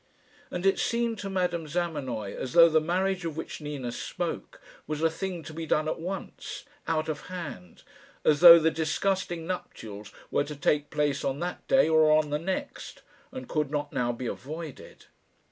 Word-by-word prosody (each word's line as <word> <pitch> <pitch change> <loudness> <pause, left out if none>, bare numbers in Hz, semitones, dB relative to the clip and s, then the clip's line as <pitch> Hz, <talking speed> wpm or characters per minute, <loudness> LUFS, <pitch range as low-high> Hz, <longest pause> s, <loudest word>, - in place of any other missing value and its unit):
And 180 +1 -4
it 195 - +4
seemed 235 -1 0
to 200 - -4
Madame 175 -4 -1
Zamenoy 145 - -3
as 130 - -5
though 170 0 +8
the 160 0 +3
marriage 185 +3 0
of 160 -2 -4
which 160 - -6
Nina 145 -5 -4
spoke - - -5 0.3
was 155 +1 -3
a 165 - +4
thing 180 0 -4
to 155 - -9
be 165 0 -5
done 155 0 +2
at 155 - -2
once, 185 +4 -6 0.2
out 155 -1 0
of 150 -2 -4
hand 150 - -8 0.4
as 150 -1 +4
though 170 -1 +12
the 160 0 +3
disgusting 170 +2 -1
nuptials 105 - -6 0.2
were - - +2
to 150 +1 -7
take 145 +1 +1
place 145 -1 0
on 135 0 -1
that 180 +1 -4
day 270 -8 +5
or 160 -1 +5
on 155 -1 +3
the 150 - 0
next, 185 +4 -5 0.3
and 130 -1 -7
could 150 -3 -1
not 145 0 -3
now 120 -1 +1
be 120 +1 -6
avoided. 155 +4 -7
160 Hz, 180 wpm, -28 LUFS, 145-175 Hz, 0.4 s, though